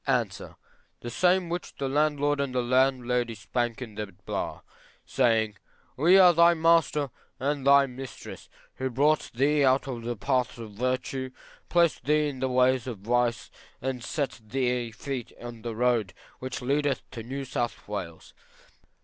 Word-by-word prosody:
A. -, -, +3 dB, 0.8 s
The 120 Hz, -, -6 dB
same 180 Hz, +5 st, +3 dB
which 175 Hz, +1 st, -5 dB
the 135 Hz, -, -3 dB
landlord 145 Hz, 0 st, +1 dB
and 135 Hz, -2 st, -2 dB
landlady 125 Hz, -2 st, +2 dB
spake 120 Hz, +3 st, -2 dB
in 110 Hz, -4 st, -10 dB
the 105 Hz, 0 st, -4 dB, 0.2 s
bar, -, -, -4 dB, 0.4 s
saying, 110 Hz, -5 st, +1 dB, 0.4 s
We 170 Hz, +8 st, +5 dB
are 180 Hz, -2 st, +8 dB
thy 170 Hz, +1 st, +6 dB
master 160 Hz, -4 st, +3 dB, 0.3 s
and 140 Hz, 0 st, -1 dB
thy 140 Hz, 0 st, +7 dB
mistress 130 Hz, -2 st, -9 dB, 0.3 s
who 130 Hz, 0 st, -2 dB
brought 145 Hz, +5 st, +2 dB
thee 145 Hz, +3 st, +3 dB
out 130 Hz, +1 st, +3 dB
of 125 Hz, -3 st, -4 dB
the 120 Hz, +1 st, -3 dB
paths 130 Hz, +2 st, 0 dB
of 115 Hz, -2 st, -8 dB
virtue, 130 Hz, +3 st, -2 dB, 0.4 s
placed 170 Hz, -2 st, +2 dB
thee 150 Hz, +1 st, +3 dB
in 135 Hz, -2 st, -7 dB
the 130 Hz, -, 0 dB
ways 130 Hz, 0 st, +2 dB
of 120 Hz, -4 st, -4 dB
vice, 120 Hz, 0 st, 0 dB, 0.3 s
and 130 Hz, -2 st, -3 dB
set 140 Hz, -3 st, -3 dB
thy 125 Hz, +1 st, -1 dB
feet 125 Hz, +2 st, -6 dB
on 120 Hz, -1 st, -8 dB
the 115 Hz, 0 st, -5 dB
road 115 Hz, -6 st, +1 dB, 0.2 s
which 130 Hz, 0 st, -5 dB
leadeth 140 Hz, +1 st, 0 dB
to 115 Hz, -, -6 dB
New 135 Hz, +4 st, -5 dB
South 120 Hz, -2 st, -3 dB
Wales. -, -, -6 dB
130 Hz, 155 wpm, -27 LUFS, 120-145 Hz, 0.8 s, are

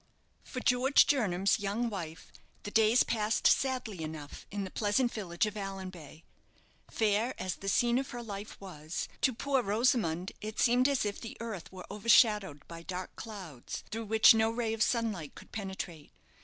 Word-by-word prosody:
For 255 Hz, -, -6 dB
George 255 Hz, +3 st, +5 dB
Jernam's 200 Hz, -9 st, +2 dB
young 205 Hz, +4 st, -1 dB
wife, 170 Hz, -7 st, -7 dB, 0.3 s
the 205 Hz, -, -6 dB
days 220 Hz, +3 st, +5 dB
passed 215 Hz, -1 st, 0 dB
sadly 250 Hz, -9 st, +2 dB
enough 155 Hz, -2 st, -8 dB
in 200 Hz, 0 st, -3 dB
the 190 Hz, -, -6 dB
pleasant 230 Hz, +4 st, +1 dB
village 180 Hz, -3 st, -1 dB
of 210 Hz, -, -3 dB
Allanbay. 185 Hz, -6 st, -7 dB, 0.7 s
Fair 220 Hz, +3 st, +1 dB
as 185 Hz, -1 st, -3 dB
the 195 Hz, -, -4 dB
scene 240 Hz, +4 st, +3 dB
of 270 Hz, -, -4 dB
her 240 Hz, 0 st, -6 dB
life 205 Hz, -2 st, -7 dB
was, 160 Hz, -5 st, -5 dB
to 265 Hz, -, +4 dB
poor 265 Hz, +2 st, 0 dB
Rosamond 205 Hz, -5 st, +1 dB
it 215 Hz, +1 st, -6 dB
seemed 250 Hz, +2 st, +4 dB
as 275 Hz, -6 st, +1 dB
if 205 Hz, -1 st, -3 dB
the 230 Hz, -, -8 dB
earth 220 Hz, -6 st, -6 dB
were 185 Hz, -1 st, -9 dB
overshadowed 210 Hz, -, +3 dB
by 165 Hz, 0 st, -8 dB
dark 180 Hz, +1 st, -6 dB
clouds, 185 Hz, -, -7 dB
through 225 Hz, +1 st, -4 dB
which 220 Hz, +1 st, +7 dB
no 220 Hz, 0 st, +3 dB
ray 230 Hz, -1 st, -1 dB
of 225 Hz, -, -4 dB
sunlight 215 Hz, -, 0 dB
could -, -, -13 dB
penetrate. 190 Hz, -6 st, -6 dB
210 Hz, 170 wpm, -31 LUFS, 185-230 Hz, 0.7 s, which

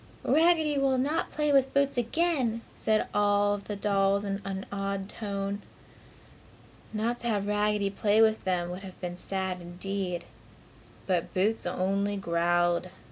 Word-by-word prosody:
"Raggedy 315 Hz, -3 st, +3 dB
will 270 Hz, -1 st, +2 dB
not 290 Hz, +5 st, 0 dB
play 300 Hz, -1 st, +1 dB
with 270 Hz, -1 st, +3 dB
Boots 280 Hz, 0 st, +3 dB
again!" 245 Hz, -2 st, +1 dB
said 215 Hz, 0 st, +1 dB
all 205 Hz, 0 st, +3 dB
of 205 Hz, -1 st, -5 dB
the 210 Hz, -, -3 dB
dolls 200 Hz, 0 st, +1 dB
in 195 Hz, 0 st, -2 dB
an 195 Hz, 0 st, -4 dB
awed 195 Hz, -1 st, -2 dB
tone. 200 Hz, -1 st, -4 dB, 1.3 s
Not 225 Hz, +3 st, -1 dB
to 240 Hz, -, -4 dB
have 205 Hz, -3 st, 0 dB
Raggedy 210 Hz, -1 st, +1 dB
play 205 Hz, +1 st, +2 dB
with 220 Hz, -1 st, +4 dB
them 180 Hz, -2 st, -1 dB
would 180 Hz, +2 st, -6 dB
have 190 Hz, -2 st, -10 dB
been 175 Hz, -1 st, -4 dB
sad, 190 Hz, 0 st, -3 dB
indeed. 180 Hz, 0 st, -4 dB, 0.8 s
But 180 Hz, -3 st, -1 dB
Boots 205 Hz, +2 st, +1 dB
only 195 Hz, +3 st, 0 dB
growled. 175 Hz, -1 st, +1 dB
200 Hz, 145 wpm, -29 LUFS, 190-225 Hz, 1.3 s, with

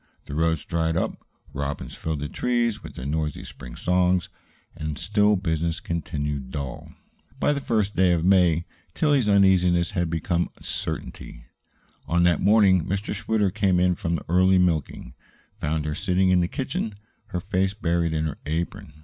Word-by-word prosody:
The 70 Hz, -, -8 dB
roads 80 Hz, -1 st, 0 dB
dried 80 Hz, -1 st, 0 dB
up, -, -, -2 dB, 0.3 s
robins 70 Hz, +1 st, -4 dB
filled 80 Hz, -3 st, -3 dB
the 75 Hz, -, -2 dB
trees 120 Hz, +4 st, 0 dB
with -, -, -10 dB
their 65 Hz, -, -7 dB
noisy 75 Hz, +1 st, -2 dB
spring 65 Hz, -3 st, -10 dB
songs, 90 Hz, +2 st, +1 dB, 0.5 s
and 75 Hz, -1 st, -4 dB
still 105 Hz, +5 st, +3 dB
business 85 Hz, -3 st, -1 dB
continued 75 Hz, -5 st, -3 dB
dull. 70 Hz, -2 st, -6 dB, 0.5 s
By 145 Hz, -, +2 dB
the 140 Hz, -, -3 dB
first 105 Hz, -5 st, 0 dB
day 95 Hz, -1 st, +4 dB
of 85 Hz, -1 st, 0 dB
May, 90 Hz, -3 st, +4 dB, 0.3 s
Tillie's 145 Hz, -8 st, +2 dB
uneasiness 90 Hz, -3 st, +4 dB
had 90 Hz, -4 st, -1 dB
become 85 Hz, +2 st, -1 dB
certainty. -, -, -5 dB, 0.6 s
On 85 Hz, +1 st, +2 dB
that 85 Hz, -2 st, +3 dB
morning 100 Hz, -4 st, +5 dB
Mr. 100 Hz, +2 st, -2 dB
Schwitter, 105 Hz, -1 st, 0 dB
coming 95 Hz, -3 st, +2 dB
in 90 Hz, -, +3 dB
from 85 Hz, -3 st, -2 dB
the 80 Hz, -, -5 dB
early 95 Hz, +2 st, +4 dB
milking, 80 Hz, -8 st, 0 dB, 0.5 s
found 80 Hz, -3 st, -1 dB
her 75 Hz, -, -2 dB
sitting 95 Hz, +2 st, +1 dB
in 90 Hz, -1 st, +4 dB
the 85 Hz, -, +1 dB
kitchen, 120 Hz, -3 st, -3 dB, 0.3 s
her 90 Hz, -, -3 dB
face 95 Hz, +2 st, -1 dB
buried 85 Hz, -4 st, 0 dB
in 80 Hz, 0 st, -1 dB
her 75 Hz, -2 st, -4 dB
apron. 80 Hz, -1 st, -3 dB
85 Hz, 165 wpm, -25 LUFS, 80-95 Hz, 0.6 s, morning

